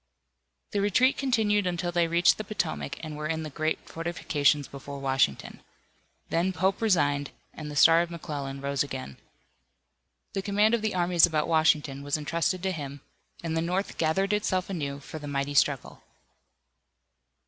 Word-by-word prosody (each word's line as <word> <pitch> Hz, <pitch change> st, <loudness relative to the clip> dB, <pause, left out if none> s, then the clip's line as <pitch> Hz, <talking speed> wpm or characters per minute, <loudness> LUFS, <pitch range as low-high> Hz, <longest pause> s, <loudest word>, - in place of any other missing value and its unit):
The 205 Hz, -, 0 dB
retreat 250 Hz, +7 st, +3 dB
continued 215 Hz, -7 st, +1 dB
until 175 Hz, 0 st, -2 dB
they 170 Hz, -1 st, +2 dB
reached 170 Hz, +4 st, +3 dB
the -, -, -2 dB
Potomac 195 Hz, -6 st, -3 dB
and 155 Hz, -2 st, -6 dB
were 150 Hz, 0 st, -4 dB
in 160 Hz, 0 st, -2 dB
the 155 Hz, -, -6 dB
great 155 Hz, +3 st, -1 dB
fortifications 150 Hz, -4 st, 0 dB
before 140 Hz, +1 st, -8 dB
Washington. 135 Hz, -, 0 dB, 0.7 s
Then 175 Hz, +3 st, +1 dB
Pope 190 Hz, +4 st, 0 dB
resigned, 145 Hz, -10 st, +2 dB, 0.2 s
and 155 Hz, -1 st, -7 dB
the 150 Hz, -, -7 dB
star 165 Hz, +3 st, +7 dB
of 170 Hz, -, -2 dB
McClellan 145 Hz, -5 st, -5 dB
rose 140 Hz, -1 st, -1 dB
again. 130 Hz, -, -5 dB, 1.2 s
The 195 Hz, -, -1 dB
command 205 Hz, +3 st, +2 dB
of 235 Hz, -, +2 dB
the 215 Hz, -3 st, -1 dB
armies 175 Hz, -1 st, +4 dB
about 155 Hz, -2 st, 0 dB
Washington 155 Hz, -4 st, +2 dB
was 145 Hz, +1 st, -1 dB
entrusted 165 Hz, +4 st, -1 dB
to 190 Hz, -, 0 dB
him, 140 Hz, -4 st, -6 dB, 0.4 s
and 165 Hz, -1 st, -2 dB
the 160 Hz, -, +1 dB
North 180 Hz, +4 st, -2 dB
gathered 190 Hz, +6 st, +1 dB
itself 195 Hz, -3 st, 0 dB
anew 140 Hz, -6 st, -3 dB
for 155 Hz, +3 st, -8 dB
the 145 Hz, -, -8 dB
mighty 140 Hz, 0 st, -2 dB
struggle. 140 Hz, -1 st, +1 dB
165 Hz, 160 wpm, -27 LUFS, 145-185 Hz, 1.2 s, star